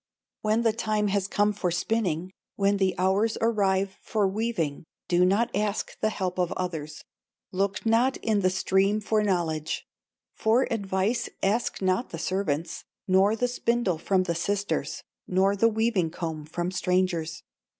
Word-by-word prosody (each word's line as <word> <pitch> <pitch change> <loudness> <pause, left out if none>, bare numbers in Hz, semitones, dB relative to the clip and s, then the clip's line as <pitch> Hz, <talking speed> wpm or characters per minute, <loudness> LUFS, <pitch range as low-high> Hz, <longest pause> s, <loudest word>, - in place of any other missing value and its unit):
"When 215 +2 +1
the 225 -2 +3
time 215 -2 0
has 195 -1 0
come 205 +1 +2
for 195 -3 -1
spinning, 180 -1 -1 0.2
When 200 0 +2
the 190 -1 +1
hours 195 +5 +2
arrive 195 -4 +1
for 210 -3 +1
weaving, 190 -8 -2 0.2
Do 175 0 +3
not 200 +6 +2
ask 210 0 -1
the 215 - +2
help 185 -3 -3
of 180 -1 +1
others, 160 -5 -5 0.5
Look 195 +3 -1
not 235 +4 +3
in 215 -2 0
the 185 -2 +3
stream 190 +2 +2
for 215 0 +1
knowledge, 165 -6 -1 0.5
For 225 +4 +3
advice 200 +2 -1
ask 205 0 0
not 185 +6 +1
the 165 - -6
servants, 165 -1 -2 0.2
Nor 195 +3 +4
the 245 +2 0
spindle 235 -7 0
from 190 +2 +2
the 170 -2 -1
sisters, 200 +4 -2 0.2
Nor 190 +2 +2
the 230 +3 +4
weaving 220 -6 +1
comb 160 -3 -5
from 175 +3 -3
strangers. 180 -3 0
195 Hz, 150 wpm, -27 LUFS, 180-215 Hz, 0.5 s, Nor